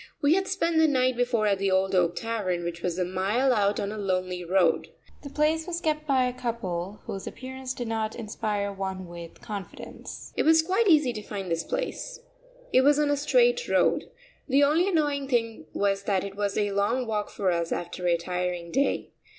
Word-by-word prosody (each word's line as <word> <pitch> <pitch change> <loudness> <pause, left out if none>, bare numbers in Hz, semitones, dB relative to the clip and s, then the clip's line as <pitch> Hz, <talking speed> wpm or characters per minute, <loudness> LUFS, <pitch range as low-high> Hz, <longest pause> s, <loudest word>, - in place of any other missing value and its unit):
We 285 +2 +4
had 385 +1 +1
spent 340 -4 +1
the 320 - +6
night 255 -3 +2
before 245 -3 +1
at 200 -2 +2
the 195 0 +1
Old 190 0 +2
Oak 175 -2 +3
Tavern, 205 -7 -2
which 170 0 -4
was 175 -1 -2
a 180 - +1
mile 200 +9 +1
out 205 -2 +2
on 200 - -2
a 215 - -5
lonely 185 -2 -1
road. 180 -1 +2 0.3
The 280 - -8
place 310 +3 +1
was 340 -1 -2
kept 305 -2 -1
by 265 -3 +3
a 250 - -1
couple 210 -6 -4
whose 195 - -6
appearance 260 0 -6
did 245 - -4
not 220 -1 -2
inspire 210 -2 -3
one 190 -1 -4
with 170 -1 -10
confidence. 210 -6 -8
It - - +1
was 320 0 +5
quite 385 +6 +1
easy 300 -8 +5
to 215 - -5
find 195 -3 -6
this 165 0 0
place. - - -4 0.5
It 255 - +6
was 290 +2 +5
on 295 -1 +2
a - - +3
straight 485 - +3
road. - - +2 0.4
The 275 +2 +5
only 315 +6 +3
annoying 295 -6 +1
thing 230 - -1
was 200 -1 0
that 195 -2 +1
it 200 -1 -6
was 200 -1 -1
a 205 -1 +1
long 210 +6 +1
walk 210 -2 -2
for 190 -3 0
us 170 -1 -1
after 175 +1 -3
a 170 -1 +3
tiring 180 0 -3
day. 275 +2 0
215 Hz, 205 wpm, -27 LUFS, 190-285 Hz, 0.5 s, the